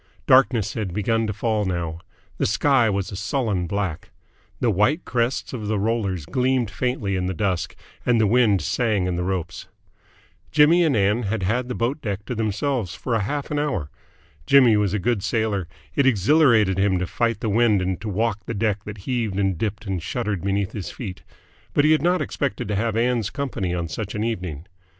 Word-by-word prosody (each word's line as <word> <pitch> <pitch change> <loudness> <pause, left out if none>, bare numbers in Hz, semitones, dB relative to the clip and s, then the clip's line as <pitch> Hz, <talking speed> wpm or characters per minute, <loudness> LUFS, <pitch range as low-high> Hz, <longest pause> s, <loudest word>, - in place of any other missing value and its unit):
Darkness 130 -5 +4
had 100 -6 -4
begun 115 +2 +1
to - - -1
fall 105 +1 0
now. 85 -4 -3 0.4
The - - +2
sky 120 +2 +3
was 100 -1 -2
a - - -6
sullen 100 -3 -1
black. 95 -4 -3 0.5
The 120 - +2
white 105 - +1
crests 120 +2 -1
of 110 -5 -4
the 110 0 0
rollers 100 -6 -1
gleamed 125 - 0
faintly 115 -5 -1
in 90 -1 -1
the 95 - -3
dusk, 90 -3 -1 0.3
and 120 -2 +3
the 110 - +4
wind 105 -5 +3
sang 110 -4 0
in 90 -1 -1
the 90 - -2
ropes. 90 -2 -3 0.8
Jimmy 160 +4 +5
and 155 -5 +2
Ann 105 +4 +2
had 105 -2 -2
had 120 +6 0
the 125 - -4
boat 125 +6 -1
deck 100 -2 -4
to - - -3
themselves 110 -2 -1
for 115 +5 -2
half 140 +9 -3
an 145 - 0
hour. 95 - -2 0.6
Jimmy 130 -5 +6
was 105 -1 +1
a - - +2
good 105 +2 0
sailor: 105 -4 -1 0.3
it 140 -2 +3
exhilarated 110 - +4
him 95 -1 +2
to 90 - -1
fight 115 +3 -1
the 110 - -3
wind 110 -1 +3
and 95 0 -2
to 110 - -4
walk 110 +2 0
a 115 - -3
deck 105 -1 0
that 105 0 -7
heaved 115 -6 -1
and 95 -2 +1
dipped 105 +4 -3
and 95 -3 -2
shuddered 100 0 -2
beneath 100 0 -1
his 100 -5 -5
feet; 95 -7 -7 0.5
but 145 - +4
he 155 - +5
had 155 - +4
not 180 +3 +2
expected 135 -9 -3
to 105 - 0
have 110 +2 0
Ann's 120 -2 +1
company 120 - -3
on 85 -1 -2
such 100 +5 -5
an 105 - -1
evening. 90 -9 -4
105 Hz, 200 wpm, -23 LUFS, 95-120 Hz, 0.8 s, Jimmy